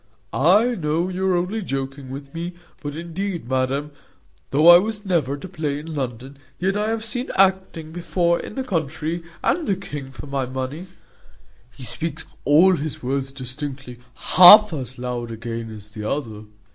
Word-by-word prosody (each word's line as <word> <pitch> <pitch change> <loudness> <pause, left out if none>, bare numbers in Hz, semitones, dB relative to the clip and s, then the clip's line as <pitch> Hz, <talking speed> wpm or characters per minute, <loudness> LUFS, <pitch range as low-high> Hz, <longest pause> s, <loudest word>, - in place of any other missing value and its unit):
I 205 - +4
know 170 -2 -1
you 190 +1 -2
are 185 -2 +3
only 185 +6 -2
joking 135 -4 -4
with 140 +1 -8
me; 170 +2 -5 0.3
but 145 -1 -5
indeed, 170 -1 -4
madam, 130 +3 -1 0.6
though 150 +4 +3
I 175 0 +11
was 210 +1 -4
never 160 -8 0
at 145 - -9
a - - -6
play 155 -6 -3
in 160 +2 -7
London, 130 -1 -5 0.2
yet 190 +2 0
I 210 +1 0
have 225 0 -2
seen 245 +3 -3
acting 190 -4 +1
before 170 0 0
in - - -8
the 265 - -2
country; 160 - -2 0.2
and 345 - +1
the 195 - +2
king 145 -8 -7
for 120 -2 -10
my 140 -2 -2
money; 130 +7 -5 0.8
he 125 +2 -13
speaks 160 +4 -4 0.2
all 175 +6 +6
his 150 -2 -5
words 135 +1 -2
distinctly, 135 -1 -7 0.2
half 205 +2 +8
as 130 -4 -5
loud 125 -1 -4
again 115 0 -5
as 105 -1 -11
the 105 -1 -5
other. 110 -7 -4
150 Hz, 170 wpm, -22 LUFS, 130-180 Hz, 0.8 s, I